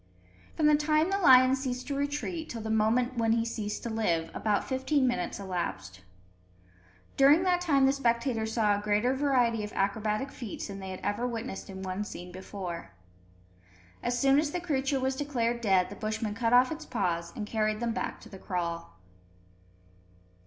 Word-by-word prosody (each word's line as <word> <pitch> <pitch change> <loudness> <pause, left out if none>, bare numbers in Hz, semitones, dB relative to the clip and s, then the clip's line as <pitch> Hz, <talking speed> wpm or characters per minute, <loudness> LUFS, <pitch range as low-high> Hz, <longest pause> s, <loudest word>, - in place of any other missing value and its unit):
From 310 - +2
the 300 - +6
time 305 +3 +2
the 395 - +1
lion 255 -6 +7
ceased 255 -2 -4
to 285 - -3
retreat, 295 +4 -3
till 230 - -5
the 220 - -3
moment 235 +3 +1
when 225 -1 +3
he 230 0 +1
ceased 215 -2 -4
to 235 - -3
live, 170 -7 0
about 210 -2 0
fifteen 265 +1 +1
minutes 190 -7 -2
elapsed. 95 - -4 1.2
During 285 +5 +6
that 360 -1 +2
time 280 -6 +3
the 270 - +4
spectators 235 -3 0
saw 215 -3 +3
a 205 - -1
greater 210 +4 +1
variety 250 -5 +1
of 210 - -5
acrobatic 215 +6 -1
feats 230 -5 -6
than 195 0 -6
they 190 -1 -7
had 185 - -7
ever 205 +5 -1
witnessed 225 -5 -5
in 190 0 -7
one 190 +2 -3
scene 180 -3 -8
before. 185 - -7 1.1
As 245 +1 -1
soon 275 +2 +4
as 300 -1 0
the 355 - -3
creature 275 -5 0
was 265 0 0
declared 240 -4 -1
dead, 190 -4 +2
the - - -7
Bushmen 215 0 -3
cut 230 +1 0
off 250 +3 +5
its 320 0 -5
paws 170 -1 -1
and 210 - -4
carried 215 0 0
them 235 -1 -1
back - - -3
to - - -13
the 195 - -11
kraal. 170 - -4
230 Hz, 180 wpm, -29 LUFS, 205-270 Hz, 1.2 s, lion